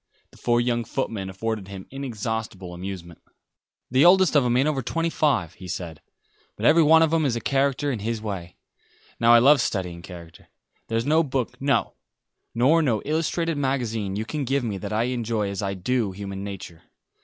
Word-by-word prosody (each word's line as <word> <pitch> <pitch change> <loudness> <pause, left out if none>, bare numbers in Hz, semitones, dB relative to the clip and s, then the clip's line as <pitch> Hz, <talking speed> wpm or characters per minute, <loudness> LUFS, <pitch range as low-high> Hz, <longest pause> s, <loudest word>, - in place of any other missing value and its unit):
The - - -18
four 120 0 +1
young 120 -1 0
footmen 110 -5 -3
afforded 105 +1 -4
him 95 -1 -8
inexhaustible 110 -8 -4
amusement. 90 -2 -8 0.7
"The 130 +2 +4
oldest 185 -1 +6
of 145 - +5
'em 120 0 +2
ain't 135 +3 +3
over 145 -3 0
twenty 165 +6 -1
five," 120 - +1
he 90 - -11
said, 85 -3 -6 0.5
"but 110 - -4
every 160 +5 +6
one 160 +1 +6
of 160 0 +1
'em 165 -1 +3
is 130 -5 +1
a - - -1
character 140 +2 0
in 120 - -3
his 115 +2 -2
way. 95 -5 -6 0.6
Now 115 0 +5
I 120 - +9
love 135 +3 +6
studying 90 -6 -3
character. 85 -3 -12 0.4
There's 115 +1 -1
no 155 +2 +4
book, 130 -5 -2
no, 140 0 +1 0.6
nor 140 +8 +4
no 115 -9 0
illustrated 165 +1 -1
magazine, 115 -8 -1
you 110 +2 -3
can 150 +4 -3
give 135 +1 0
me 105 -5 -3
that 100 +1 -6
I 110 +2 +1
enjoy 115 -4 -1
as 100 - -4
I 100 -1 -2
do 105 +1 -1
human 100 0 -6
nature. 95 -4 -8
115 Hz, 190 wpm, -24 LUFS, 100-140 Hz, 0.7 s, I